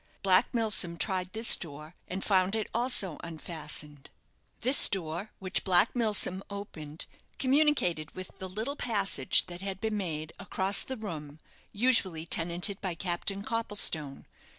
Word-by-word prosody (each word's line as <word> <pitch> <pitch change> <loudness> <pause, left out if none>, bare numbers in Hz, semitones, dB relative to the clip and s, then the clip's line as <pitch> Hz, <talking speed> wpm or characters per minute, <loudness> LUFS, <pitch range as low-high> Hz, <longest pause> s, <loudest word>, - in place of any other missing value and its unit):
Black 190 +3 +4
Milsom 210 -7 +1
tried 185 -2 -2
this 225 +3 +7
door, 155 0 -9
and 190 +2 -5
found 190 0 +2
it 220 - -2
also 230 - +2
unfastened. 150 -3 -6 0.5
This 260 +3 +6
door, 175 +2 -3
which 190 0 -2
Black 190 +5 +3
Milsom 210 -5 +1
opened, 165 -7 -8 0.3
communicated 260 - +1
with 185 0 -9
the 190 - -6
little 220 +9 -4
passage 200 - +2
that 175 0 -9
had 195 -1 -5
been 220 0 -2
made 160 -5 -5
across 195 0 +2
the 260 - -5
room 155 -9 -8 0.3
usually 200 -8 +1
tenanted 175 +4 +3
by 185 -4 -4
Captain 190 +3 -2
Copplestone. 205 -10 -2
190 Hz, 135 wpm, -29 LUFS, 165-215 Hz, 0.5 s, this